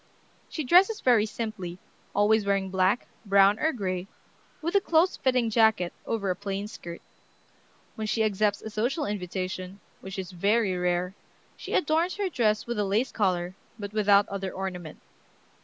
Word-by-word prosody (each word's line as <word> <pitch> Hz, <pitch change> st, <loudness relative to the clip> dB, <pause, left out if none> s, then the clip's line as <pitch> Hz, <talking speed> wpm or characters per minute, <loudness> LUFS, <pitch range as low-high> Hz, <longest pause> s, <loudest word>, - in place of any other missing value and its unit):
She 310 Hz, -, -3 dB
dresses 370 Hz, -, +5 dB
very 230 Hz, -4 st, +3 dB
simply, 210 Hz, -6 st, -5 dB, 0.4 s
always 210 Hz, +1 st, +4 dB
wearing 195 Hz, -1 st, 0 dB
black, 190 Hz, +4 st, +2 dB, 0.2 s
brown, 200 Hz, 0 st, +4 dB
or 315 Hz, -, +2 dB
gray, 185 Hz, -, -3 dB, 0.5 s
with 335 Hz, +2 st, -3 dB
a 400 Hz, -, +4 dB
close 340 Hz, +1 st, +3 dB
fitting 250 Hz, -3 st, +1 dB
jacket 220 Hz, -6 st, +3 dB
over 200 Hz, -4 st, -1 dB
a -, -, -1 dB
plain 200 Hz, +1 st, -4 dB
skirt. 170 Hz, -5 st, -9 dB, 0.9 s
When 220 Hz, -1 st, -4 dB
she 220 Hz, +1 st, +1 dB
accepts 210 Hz, -1 st, +1 dB
a 220 Hz, -, -6 dB
social 245 Hz, +9 st, -1 dB
invitation, 185 Hz, -1 st, -4 dB, 0.2 s
which 190 Hz, +1 st, -8 dB
is 190 Hz, -1 st, -5 dB
very 200 Hz, +2 st, +1 dB
rare, 180 Hz, +1 st, 0 dB, 0.4 s
she -, -, -5 dB
adorns 330 Hz, +2 st, +1 dB
her 400 Hz, -2 st, -1 dB
dress 215 Hz, -8 st, +1 dB
with 235 Hz, -2 st, -3 dB
a -, -, +2 dB
lace 210 Hz, +6 st, 0 dB
collar, 180 Hz, -3 st, 0 dB, 0.2 s
but 205 Hz, -1 st, -7 dB
without 205 Hz, -1 st, +4 dB
other 195 Hz, -1 st, -4 dB
ornament. 180 Hz, -4 st, -6 dB
205 Hz, 155 wpm, -27 LUFS, 190-230 Hz, 0.9 s, dresses